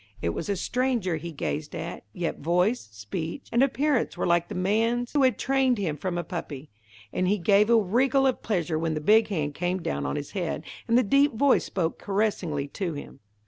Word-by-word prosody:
It 85 - -1
was 160 - -4
a 200 - +1
stranger 235 -4 0
he 170 +2 -6
gazed 150 +2 -4
at, 170 +1 -6
yet 175 -2 -3
voice, 180 - +1
speech, 135 - -6
and 235 - +3
appearance 275 -5 +1
were - - -1
like 170 0 +2
the - - -7
man's 225 +6 0
who 290 - +3
had 255 -5 +3
trained 265 -2 +2
him 175 -7 -1
from 175 +2 -3
a 175 - -1
puppy, 155 -4 -6 0.4
and 185 - 0
he 205 +3 +2
gave 200 +3 +4
a 235 - +6
wriggle 255 +7 +2
of 260 - +1
pleasure 175 -7 -1
when 160 -1 -1
the - - -1
big 215 +8 +4
hand 150 -8 -2
came 180 +4 -1
down 70 - -2
on - - -2
his 145 -1 -5
head, 180 -4 -3 0.2
and 230 +1 +4
the 250 - +5
deep 275 +5 +3
voice 275 +3 +3
spoke 170 -4 -2
caressingly 195 -8 -1
to 180 -1 -3
him. 145 -1 -9
185 Hz, 210 wpm, -26 LUFS, 165-235 Hz, 0.4 s, a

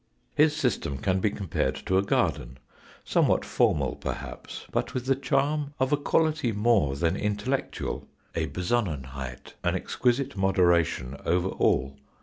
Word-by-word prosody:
His 150 0 +4
system 125 - -1
can 95 +6 +1
be 105 - +2
compared 100 -4 -1
to 95 0 +3
a - - +3
garden, 65 -10 0 0.5
somewhat - - +2
formal - - +1
perhaps, - - -6
but 130 - -2
with 125 -1 -2
the 135 - +4
charm 140 +2 0
of 130 +2 +2
a - - +4
quality 155 -3 +1
more 105 - +2
than 85 +4 +1
intellectual, 105 +7 -2 0.3
a - - -1
besonnenheit, 70 - -3
an - - +1
exquisite 125 0 0
moderation 85 -8 +2
over 90 +2 +1
all. 70 -4 +1
100 Hz, 135 wpm, -27 LUFS, 85-130 Hz, 0.5 s, His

